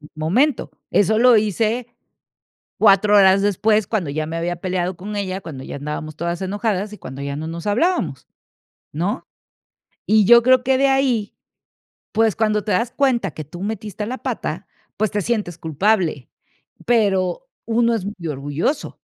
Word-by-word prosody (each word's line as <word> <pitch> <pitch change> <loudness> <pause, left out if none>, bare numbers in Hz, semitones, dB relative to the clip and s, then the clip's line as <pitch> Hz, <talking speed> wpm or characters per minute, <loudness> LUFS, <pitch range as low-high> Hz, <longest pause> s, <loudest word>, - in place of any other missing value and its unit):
en 150 - -13
el - - -48
momento, 220 - +1 0.2
eso 215 +2 +3
lo 245 -1 +6
hice 220 +3 0 0.9
4 205 0 +5
horas 195 0 +6
después, 205 +1 +2
cuando 190 -10 -1
ya 155 +2 -2
me 165 - -5
había 175 +1 -2
peleado 180 0 -2
con 205 +4 -7
ella, 190 -1 -3
cuando 140 -7 -8
ya - - -7
andábamos 150 +1 -5
todas 170 +2 -3
enojadas, 205 +1 -2
y - - -9
cuando 135 -4 -9
ya 140 0 -4
no 155 +2 -5
nos 170 +4 -6
hablábamos, 235 - 0 0.7
¿no? 180 - -2 0.8
Y 215 -1 +4
yo 235 +3 +8
creo 255 0 +4
que 260 +1 +2
de 275 +1 +3
ahí, 260 -6 +1 0.8
pues, 220 -1 +2
cuando 215 -2 +1
te 210 - -1
das 230 +7 0
cuenta 240 - +1
que 155 - -7
tú 175 +6 -10
metiste 210 -1 -4
la 255 +3 -4
pata, - - -4 0.3
pues, 215 -2 0
te 205 - -1
sientes 205 -6 -2
culpable, 160 - 0 0.6
pero 205 - +1 0.2
uno 235 +1 +2
es 215 -5 -3
muy 185 -5 -6
orgulloso 145 - -2
205 Hz, 165 wpm, -20 LUFS, 170-225 Hz, 0.9 s, yo